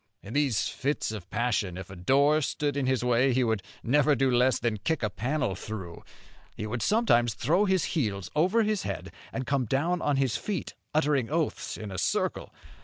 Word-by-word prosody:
In 100 - -8
these 140 -7 +1
fits 140 -3 -2
of 105 -6 -7
passion, 105 -7 -1
if 95 0 -8
a - - -8
door 140 - +3
stood 145 0 -1
in 140 -2 0
his 130 -2 +1
way 125 +2 +3
he 130 +1 +2
would 110 -4 0 0.2
never 145 +4 +3
do 135 0 +2
less 125 +1 +3
than 115 -2 -1
kick 145 +7 -1
a 110 - 0
panel 125 +1 -1
through. 95 -3 -7 0.5
He 105 - -4
would 115 +2 -3
sometimes 120 - +3
throw 170 - +2
his 190 -3 +2
heels 105 - -1
over 185 +9 +3
his 210 -2 0
head, - - -5 0.2
and 130 - -3
come 135 -2 0
down 165 +10 0
on 145 - +1
his 135 -4 +1
feet, 200 -6 -4 0.2
uttering 145 -5 +2
oaths 160 0 -2
in 105 -2 -7
a 95 - -4
circle. - - -1
130 Hz, 195 wpm, -28 LUFS, 110-150 Hz, 0.5 s, door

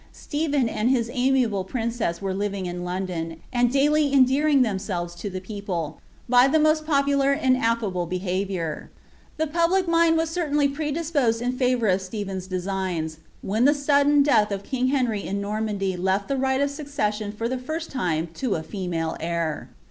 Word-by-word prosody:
Stephen 290 -4 -1
and 225 +1 0
his 240 -3 +1
amiable 250 -6 +2
princess 225 -4 -2
were 195 -1 -1
living 200 -1 -2
in 175 0 -4
London, 180 -3 -4
and 245 -1 +3
daily 290 +1 +3
endearing 275 +1 +4
themselves 190 -5 -3
to 175 +4 -6
the 185 -1 -5
people, 185 -5 -5 0.3
by 250 +1 +6
the 315 +3 +3
roost 310 0 +2
popular 280 -2 +3
and 265 -3 +2
affiible 225 -7 0
behaviour. 185 -3 -3 0.5
The 315 - +1
public 340 +4 +1
mind 335 -1 +4
was 325 0 0
certainly 295 -4 +1
predisposed 290 -4 0
in 250 +2 -1
&vour 250 -3 +1
of 190 0 +2
Stephen's 190 -1 -5
designs, 185 -4 -3 0.2
when 220 +5 +1
the 290 +2 +5
sudden 285 0 +4
death 215 -8 +3
of 200 0 -3
kinz 255 +2 -1
Henry 245 -7 0
in 200 +1 -3
Normandy 200 -2 -2
lef^ 190 +2 0
the 275 - -1
right 265 0 +1
of 280 0 +1
succession 225 -8 -2
for 225 +2 -3
the 255 +1 -2
first 315 +6 -5
time 170 - -1
to 230 +2 -1
I 160 - -5
female 170 -4 -3
heir. 165 -1 -2
230 Hz, 170 wpm, -24 LUFS, 190-280 Hz, 0.5 s, by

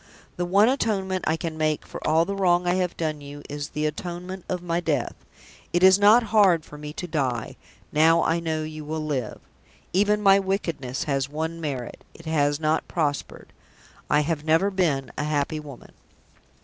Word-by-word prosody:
The 175 - -2
one 200 +5 +4
atonement 195 -8 0
I 160 - +2
can 160 -1 -5
make 155 -1 0
for - - -9
all 160 +2 +4
the 200 - -3
wrong 180 -2 +2
I 175 - +2
have 180 -1 -1
done 155 -2 -2
you 145 0 -10
is 145 0 -5
the 150 0 -2
atonement 175 +4 -5
of 180 -1 -3
my 170 -1 0
death. 175 - -1 0.6
It 175 +1 +2
is 190 +1 +7
not 215 +4 +6
hard 185 -7 +5
for - - -12
me 150 0 -7
to 180 - -5
die, 135 -8 -2 0.4
now 160 +2 +4
I 165 +1 +1
know 160 -2 -2
you 155 0 -7
will 155 +1 -4
live. 130 -7 -3 0.5
Even 205 +3 +3
my 195 -1 +6
wickedness 165 -10 -2
has 140 -2 -1
one 160 +3 -4
merit 135 -6 -5
it 165 - -14
has 145 -2 +1
not 155 0 0
prospered. 145 -4 -3 0.6
I 150 - +4
have 150 0 -2
never 165 +6 +2
been 150 -9 0
a - - 0
happy 150 0 -1
woman." 145 -5 -11
160 Hz, 185 wpm, -25 LUFS, 150-180 Hz, 0.6 s, is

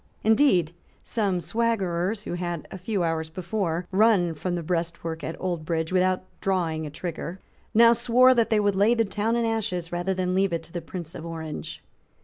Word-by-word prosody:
Indeed 215 - +4 0.3
some 200 -6 -1
swaggerers, 195 0 0
who - - -5
had, 175 -2 -4
a 190 - -7
few 195 0 -1
hours 160 -1 -1
before, 175 0 -2
run 190 -4 +4
from 175 +4 -3
the 170 - -3
breastwork 165 -1 -3
at 160 - -5
Oldbridge 165 -2 -2
without 185 0 +2 0.2
drawing 165 -5 0
a - - -6
trigger, 170 +3 -5 0.4
now 230 +1 +8
swore 245 +2 +5
that 235 -3 +2
they 220 - +3
would 205 -1 +2
lay 210 +5 +4
the 230 -1 +2
town 215 +3 -1
in 235 -1 +1
ashes 215 -7 -2
rather 175 +2 -1
than 185 0 -1
leave 190 -1 +2
it 165 -1 -2
to 165 - -15
the 175 - -3
Prince 170 -1 -7
of - - -8
Orange. 160 -2 -6
180 Hz, 185 wpm, -26 LUFS, 165-215 Hz, 0.4 s, now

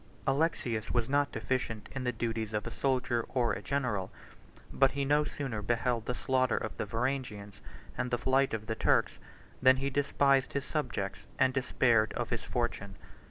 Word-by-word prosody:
75 135 - +2
Alexius 125 -8 0
was 120 -2 +1
not 145 +1 +2
deficient 120 -5 -2
in 135 -2 -4
the 125 - +2
duties 115 -2 -3
of 105 -1 -1
a - - -5
soldier 130 -3 0
or 120 -4 +1
a - - -4
general; 125 -9 -1 0.6
but 135 -1 +4
he 140 -1 -1
no 145 +2 +3
sooner 135 -8 -4
beheld 115 +1 0
the 125 - -1
slaughter 130 -1 +1
of 110 - -4
the - - -3
Varangians, 115 -3 -3 0.3
and 125 - -2
the 120 - +1
flight 135 +2 +2
of 110 -1 -6
the 110 - -2
Turks, - - +2 0.4
than 130 0 +6
he 135 +1 -1
despised 140 -1 +2
his 140 -1 -2
subjects, 125 -10 -3
and 130 0 +3
despaired 120 -4 +2
of 120 -1 -3
his 120 -2 -1
fortune. 100 -5 -2
125 Hz, 180 wpm, -31 LUFS, 115-135 Hz, 0.6 s, than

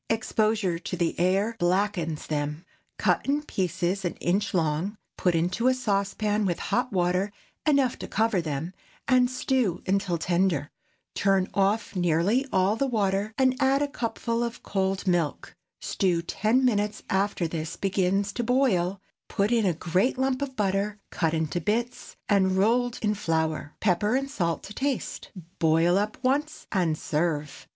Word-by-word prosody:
Exposure 215 -5 +1
to 180 - -5
the 170 -1 +1
air 195 +6 +2
blackens 175 -3 0
them. 150 +2 -3 0.3
Cut - - +2
in 290 +2 +1
pieces 185 - -1
an 175 - -2
inch 200 +5 0
long, 170 +3 0 0.2
put 180 -2 +1
into 180 +9 +1
a 255 - +4
saucepan 210 -2 0
with 180 -4 0
hot 250 +1 -1
water 180 +1 +1 0.4
enough 275 -4 +3
to - - -6
cover 220 -3 +1
them, 160 +2 -4 0.3
and 250 -1 +4
stew 255 -7 0
until 190 -2 0
tender. 170 -3 0 0.4
Turn 195 -1 +1
off 200 +2 +1
nearly 180 - +2
all 190 +3 +3
the 275 +4 0
water, 205 -3 0
and 260 -1 +3
add 275 +1 +3
a - - 0
cupful 230 -2 -2
of 235 0 -5
cold 195 0 -1
milk. 175 -5 -1 0.3
Stew 175 -3 0
ten 225 +9 +1
minutes 210 -3 0
after 190 -3 0
this 160 0 -4
begins 195 +1 0
to 240 - -2
boil; 210 -7 +2 0.3
put 200 +3 0
in 230 -4 +3
a 180 - +2
great 180 +10 +1
lump 265 0 0
of 270 -2 -3
butter, 205 0 0
cut 165 -1 0
into 160 +2 -1
bits, 235 +7 -2
and 190 -2 +3
rolled 240 +4 +2
in 210 -1 +2
flour; 160 -5 -1
pepper 210 +3 +2
and 275 +1 -1
salt 170 - -1
to 205 - -9
taste. 270 +2 -3 0.3
Boil 165 +2 +3
up 210 +2 0
once, 290 +4 0
and 175 -6 +1
serve. 150 -2 -2
195 Hz, 155 wpm, -26 LUFS, 175-230 Hz, 0.4 s, a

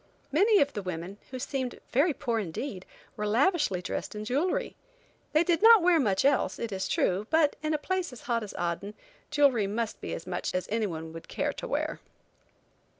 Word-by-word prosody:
Many 400 +8 +5
of 285 0 +2
the 205 - -3
women, 185 +2 -6
who 260 - -5
seemed 260 -1 -3
very 295 +7 +4
poor 235 -5 -1
indeed, 190 - -5 0.3
were 210 0 -2
lavishly 245 - +2
dressed 215 - -4
in 210 0 -5
jewelry. 285 +11 0 0.6
They 310 +2 +4
did 345 0 +1
not 450 -3 +8
wear 345 -2 +5
much 205 -4 +1
else, 280 -1 +2
it 230 -2 -4
is 190 -1 -2
true, 190 +4 0
but 315 -2 +3
in 310 0 0
a - - +1
place 370 +2 -2
as 250 - -11
hot 235 -2 -1
as 210 - -7
Aden, 175 +4 -3 0.3
jewelry 280 -8 +3
must 220 +2 -3
be - - -4
as - - -8
much 180 0 -3
as 185 - -1
anyone 165 -8 -2
would 165 - -9
care - - -2
to - - -6
wear. - - -2
240 Hz, 195 wpm, -29 LUFS, 195-305 Hz, 0.6 s, not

